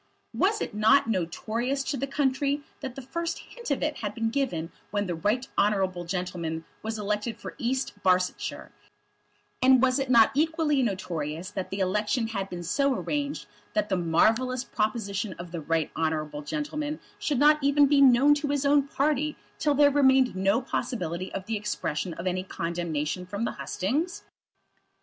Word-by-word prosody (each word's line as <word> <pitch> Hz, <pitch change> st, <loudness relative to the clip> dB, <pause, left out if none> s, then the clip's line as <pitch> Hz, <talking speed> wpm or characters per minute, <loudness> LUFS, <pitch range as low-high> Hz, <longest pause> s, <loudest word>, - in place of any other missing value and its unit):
Was 420 Hz, +3 st, +1 dB
it -, -, -3 dB
not 220 Hz, +5 st, +4 dB
notorious 225 Hz, +8 st, -1 dB
to 280 Hz, -, -2 dB
the 275 Hz, +1 st, -2 dB
country 280 Hz, +1 st, 0 dB, 0.2 s
that 265 Hz, -3 st, -6 dB
the 270 Hz, -, -7 dB
first 335 Hz, +6 st, -3 dB
hint 475 Hz, -1 st, -9 dB
of -, -, 0 dB
it -, -, -1 dB
had -, -, -4 dB
been 225 Hz, -1 st, -1 dB
given 185 Hz, -, -1 dB, 0.2 s
when 205 Hz, 0 st, -1 dB
the 180 Hz, -, -2 dB
Right 210 Hz, +10 st, 0 dB
Honourable 190 Hz, -4 st, +1 dB
gentleman 170 Hz, -3 st, -3 dB, 0.2 s
was 220 Hz, 0 st, -3 dB
elected 210 Hz, +2 st, -2 dB
for -, -, -7 dB
East 255 Hz, -4 st, -2 dB
Barsetshire, 185 Hz, -1 st, 0 dB, 0.9 s
and 260 Hz, 0 st, +6 dB
was 260 Hz, +1 st, +3 dB
it 270 Hz, -1 st, -2 dB
not 230 Hz, -3 st, +6 dB
equally 310 Hz, -1 st, +2 dB
notorious 180 Hz, -, -3 dB
that 190 Hz, -2 st, -4 dB
that 195 Hz, -, -4 dB
election 210 Hz, +4 st, 0 dB
had 195 Hz, -3 st, -3 dB
been 175 Hz, -1 st, -6 dB
so 275 Hz, -, +1 dB
arranged 290 Hz, +2 st, -2 dB, 0.3 s
that 210 Hz, -1 st, 0 dB
the 190 Hz, -, +2 dB
marvellous 225 Hz, +9 st, +2 dB
proposition 215 Hz, -2 st, -2 dB
of 175 Hz, 0 st, -9 dB
the 170 Hz, -2 st, -4 dB
Right 160 Hz, 0 st, 0 dB
Honourable 155 Hz, -2 st, -1 dB
gentleman 300 Hz, -, -3 dB, 0.2 s
should 290 Hz, -, 0 dB
not 300 Hz, +3 st, +5 dB
be 280 Hz, -, +3 dB, 0.3 s
known 270 Hz, +2 st, +6 dB
even -, -, +9 dB
to 290 Hz, 0 st, -1 dB
his 285 Hz, -1 st, 0 dB
own 285 Hz, 0 st, +4 dB
party 295 Hz, +2 st, 0 dB, 0.2 s
till 295 Hz, -1 st, +2 dB
there 285 Hz, 0 st, +6 dB
remained 265 Hz, -3 st, +4 dB
no 195 Hz, +6 st, +2 dB
possibility 180 Hz, -9 st, -3 dB
of 190 Hz, -, -5 dB
the 220 Hz, 0 st, -1 dB
expression 185 Hz, -5 st, -3 dB
of 170 Hz, -, -7 dB
any 185 Hz, 0 st, 0 dB
condemnation 170 Hz, -2 st, -3 dB
from 200 Hz, +5 st, -3 dB
the -, -, -1 dB
hustings? 290 Hz, -, -2 dB
225 Hz, 170 wpm, -27 LUFS, 185-275 Hz, 0.9 s, even